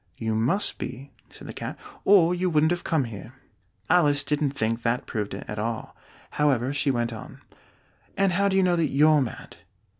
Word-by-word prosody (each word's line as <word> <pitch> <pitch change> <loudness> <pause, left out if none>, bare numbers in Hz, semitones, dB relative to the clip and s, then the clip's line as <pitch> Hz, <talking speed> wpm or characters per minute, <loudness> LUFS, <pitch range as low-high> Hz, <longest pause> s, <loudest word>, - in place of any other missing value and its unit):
"You 110 -1 -2
must 125 - 0
be," 135 +2 -7 0.2
said - - -11
the - - -7
Cat, - - -6 0.3
"or 180 -4 +6
you 180 +1 0
wouldn't 155 0 +3
have 175 - -2
come 160 -5 +1
here." 115 0 -8 0.5
Alice 145 -5 +3
didn't 150 0 0
think 115 -3 -2
that 115 +1 -1
proved 105 -4 -4
it 100 - -8
at 105 - -5
all; 115 +1 -4 0.4
however, 135 -3 +1
she 145 0 0
went 120 -2 0
on, 110 - -10 0.8
"And 195 -1 +3
how 200 +3 +2
do 195 -1 +1
you 190 - +4
know 180 -1 +3
that 165 -2 +1
you're 150 +2 +4
mad?" 120 -8 -6
145 Hz, 190 wpm, -25 LUFS, 115-170 Hz, 0.8 s, or